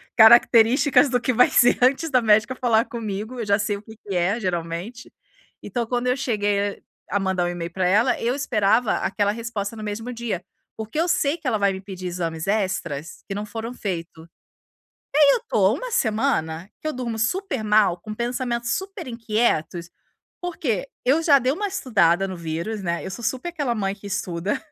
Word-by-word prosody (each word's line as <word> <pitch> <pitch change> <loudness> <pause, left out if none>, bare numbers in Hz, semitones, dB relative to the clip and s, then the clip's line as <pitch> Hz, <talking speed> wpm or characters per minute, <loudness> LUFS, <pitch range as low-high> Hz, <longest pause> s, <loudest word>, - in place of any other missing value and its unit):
características 235 +5 +6
do 250 -1 +1
que 255 +1 0
vai 250 +2 +5
ser 245 - +4
antes 275 +5 +3
da 255 -2 +4
médica 215 +2 +3
falar 230 -3 +2
comigo, 220 +1 -5
eu 230 - -2
já 200 -1 +3
sei 205 0 -1
o - - -12
que 220 +1 -13
que 200 -3 -6
é 190 +6 +1
geralmente. 180 +5 -4 0.5
Então, 240 -2 -2
quando 245 +1 -1
eu 250 +1 +2
cheguei 205 -5 -1 0.3
a 205 - 0
mandar 190 -2 0
um - - 0
e-mail 175 -1 -5
pra 185 +1 0
ela, 215 +7 +3
eu 240 +2 0
esperava 225 -4 +2
aquela 205 -1 0
resposta 225 -1 -4
no 215 - -8
mesmo 215 +4 -4
dia. 230 -7 -4 0.3
Porque 220 +7 -5
eu 335 - +2
sei 300 -2 +1
que 310 - -7
ela 230 -4 +1
vai 200 -1 +3
me 190 - -5
pedir 190 -2 -7
exames 165 -2 -4
extras, 185 -7 -2
que - - -2
não 205 +1 -4
foram 225 +3 -6
feito. 170 -7 -5
E 165 - -24 0.8
aí, 285 - +7
eu - - -1
tô - - +3
uma - - -5
semana, 215 - 0
que - - -5
eu 310 - -1
durmo 240 -3 -4
super 270 - -1
mal, 210 -4 +3
com 215 +4 -7
pensamentos 235 0 -2
super 385 -5 -6
inquietos, 215 -8 -1 0.5
porque 280 - -2 0.2
eu 285 +6 +3
já 290 -4 +6
dei 260 0 +1
uma 405 +8 -2
estudada 195 - +2
no 190 - -5
vírus, 170 +6 -4
né. 170 -1 -2
Eu 190 - -5
sou 235 +5 -7
super 260 +8 -2
aquela 290 -8 -2
mãe 195 -3 -1
que 205 0 -13
estuda 190 -2 -2
220 Hz, 195 wpm, -23 LUFS, 195-250 Hz, 0.8 s, aí